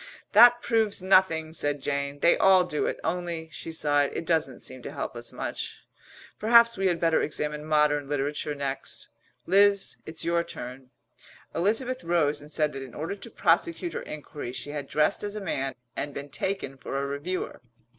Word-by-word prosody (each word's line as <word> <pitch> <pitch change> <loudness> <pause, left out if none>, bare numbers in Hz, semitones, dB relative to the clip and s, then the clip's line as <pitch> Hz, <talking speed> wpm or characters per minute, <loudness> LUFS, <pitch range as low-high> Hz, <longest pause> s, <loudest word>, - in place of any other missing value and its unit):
"That 240 +3 +8
proves 220 -5 +1
nothing," 175 -4 +3
said 145 -2 -1
Jane. 140 +1 -3
"They 170 - +6
all 190 -1 +6
do 150 -4 -1
it. - - -3
Only," 170 -2 -3
she 165 - -7
sighed, 145 -3 +2
"it - - -3
doesn't 160 -6 0
seem 130 -1 -7
to - - -7
help - - -5
us - - -4
much. - - -5 0.5
Perhaps 235 +1 +6
we 195 0 +1
had 175 -2 +1
better 165 -1 +3
examine 150 0 -3
modern 150 -2 +2
literature 145 +1 -1
next. 140 -1 -4 0.4
Liz, 200 +1 +3
it's 160 0 -3
your 170 0 +2
turn." 125 -3 -8 0.6
Elizabeth 225 +9 0
rose 155 -4 +1
and 145 - -12
said 150 0 0
that 135 - -6
in 130 -3 -9
order 160 +6 -3
to 200 - -10
prosecute 340 0 +1
her - - -3
enquiry 145 -4 -7
she 145 - -5
had 145 -2 -5
dressed 150 +9 +1
as 205 0 -4
a - - -3
man 135 -9 -2 0.2
and 145 -1 -4
been 140 +1 -6
taken 140 -3 -3
for 135 - -5
a 140 - -1
reviewer. 145 +5 -4
155 Hz, 180 wpm, -27 LUFS, 145-190 Hz, 0.6 s, That